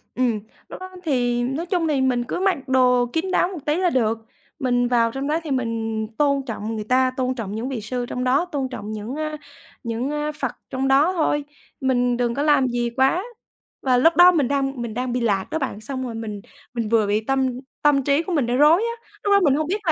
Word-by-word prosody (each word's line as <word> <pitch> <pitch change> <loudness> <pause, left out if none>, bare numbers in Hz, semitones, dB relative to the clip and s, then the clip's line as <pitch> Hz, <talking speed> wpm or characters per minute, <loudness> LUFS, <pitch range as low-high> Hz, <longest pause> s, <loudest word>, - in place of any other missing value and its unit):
Ừm, 240 -4 +1 0.3
lúc - - -8
đó 370 0 -8
thì 245 -5 +1
nói 275 +7 -2
chung 350 -3 0
thì 280 -3 +1
mình 250 -2 +1
cứ 255 - -4
mặc 385 -3 +2
đồ 250 -1 +4
kín 355 +3 -1
đáo 355 - +3
một 365 -4 -6
tí 295 - +1
là 365 -1 +2
được. 230 -5 +1 0.4
Mình 245 -2 +1
vào 235 -2 +2
trong 270 +3 -4
đó 310 +2 +1
thì 300 - -5
mình 225 -3 -2
tôn 280 -2 +2
trọng 225 -1 -4
người 215 - -3
ta, 255 +3 +2
tôn 255 0 0
trọng 210 -4 -5
những 235 +4 -3
vị 245 -5 -4
sư 245 +3 -3
trong 250 +1 -4
đó, 265 +7 +2
tôn 280 -6 -3
trọng 215 -4 -6
những 215 +5 -5
a 305 0 -3 0.5
những, 235 +3 -2
a, 300 0 -2
Phật 300 - -3 0.2
trong 265 0 -1
đó 285 +7 +4
thôi, 300 -4 +1 0.4
mình 245 -2 +1
đừng 240 -1 0
có 280 - -1
làm 290 -4 +4
gì 240 -1 -1
quá. 265 - +2 0.6
Và 255 -2 +3
lúc 325 +7 +4
đó 355 +1 +8
mình 295 -7 +1
đang 270 -2 -1
mình 230 -2 -4
đang 250 +1 -2
bị 250 - -1
lạc 200 -5 +1
đó 320 - -1
bạn 220 -6 -4
xong 260 +3 -4
rồi 235 -2 -5
mình 215 -3 -5 0.3
mình 230 -3 -2
vừa 220 -2 +3
bị 210 +1 +1
tâm 265 +1 +1 0.3
tâm 290 -2 +4
trí 285 +4 +2
của 370 - -4
mình 285 -7 +2
đang 245 +1 0
rối 310 +7 +6
á. 465 0 -5
Lúc 410 - +1
đó 400 - +6
mình 280 -3 +4
hông 310 +1 -1
biết 405 +5 -1
là - - +5
260 Hz, 245 wpm, -22 LUFS, 240-300 Hz, 0.6 s, đó